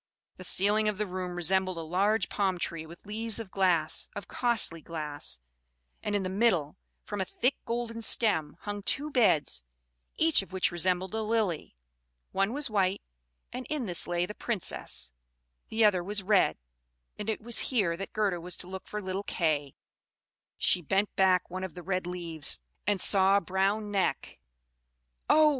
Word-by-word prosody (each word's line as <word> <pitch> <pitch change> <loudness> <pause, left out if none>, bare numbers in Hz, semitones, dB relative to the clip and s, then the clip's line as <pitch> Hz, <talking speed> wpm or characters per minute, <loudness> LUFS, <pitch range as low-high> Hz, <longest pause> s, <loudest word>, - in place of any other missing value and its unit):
The 185 - -8
ceiling 210 +4 +4
of 210 - -3
the 210 - 0
room 185 -1 -4
resembled 185 +1 +3
a - - -3
large 195 +5 +1
palm 190 -3 0
tree 165 -2 -3
with 170 +4 -14
leaves 220 +1 -2
of 215 -5 -7
glass, 180 -5 +1
of 205 - -6
costly 235 -9 +3
glass; 150 - -4 0.6
and 205 - -2
in 200 - +1
the - - -2 0.2
middle, 155 -8 0 0.3
from 205 -2 -4
a - - +2
thick 250 +7 0
golden 230 -1 -3
stem, 185 -10 +2
hung 205 0 -4
two 290 +9 -2
beds, 205 - +3 0.6
each 320 -5 +5
of 195 - -12
which 190 -1 +1
resembled 180 +2 0
a 220 - -1
lily. 215 - -1 0.6
One 195 +2 +1
was 285 +2 0
white, 195 -3 0 0.5
and 250 0 -6
in 300 -5 -1
this 175 -4 +1
lay 175 0 0
the 210 - -7
Princess; 70 - -3 0.6
the 220 0 +3
other 185 -4 +3
was 205 +2 -2
red, 195 - +3 0.6
and 210 +1 -3
it 220 - -1
was 235 +1 0
here 200 -10 +1
that 195 +3 -6
Gerda 200 -5 0
was 175 0 -4
to 180 - -2
look 190 0 -8
for 210 -1 -5
little 190 +1 -2
Kay. 150 -7 -1 0.8
She 180 - +3
bent 195 +5 0
back 185 -1 +3
one 185 +1 -5
of 185 -4 -6
the 180 - -8
red 185 -1 -2
leaves, 170 - -1 0.3
and 205 -2 +2
saw 195 +1 +5
a - - +1
brown 195 +4 0
neck. 195 -2 -1 0.9
Oh! 310 0 +7
190 Hz, 175 wpm, -29 LUFS, 175-215 Hz, 0.9 s, Oh